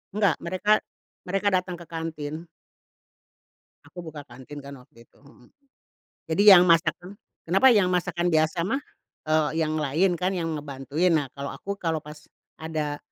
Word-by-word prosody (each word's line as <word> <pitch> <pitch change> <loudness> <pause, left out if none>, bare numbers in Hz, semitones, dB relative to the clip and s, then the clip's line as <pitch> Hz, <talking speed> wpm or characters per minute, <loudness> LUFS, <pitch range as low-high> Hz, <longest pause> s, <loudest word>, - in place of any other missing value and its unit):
Enggak 200 -6 +3
mereka 185 +4 -2 0.6
mereka 195 +2 -1
datang 180 -1 -1
ke 170 -1 -12
kantin. 160 0 -5 1.4
Aku 180 - -12
buka 155 -3 -8
kantin 130 +3 -11
kan 140 0 -9
waktu 115 -1 -20
itu, - - -31
heeh, 140 -3 -20 0.8
jadi 195 +6 +2
yang 175 - +6
masakan, 175 +3 +1 0.3
kenapa 195 +10 +4
yang 205 -6 +4
masakan 180 -1 0
biasa 160 +2 +1
mah, 270 +7 -1 0.5
eee, 155 -1 +2
yang 155 0 0
lain 155 +6 +1
kan 185 +2 0
yang 170 -3 -2
ngebantuin, 145 +4 -1
nah 145 -3 +1
kalau 140 0 -5
aku 200 0 -5
kalau 165 -4 -1
pas 150 0 -11 0.4
ada 155 -2 -3
165 Hz, 150 wpm, -25 LUFS, 150-180 Hz, 1.4 s, yang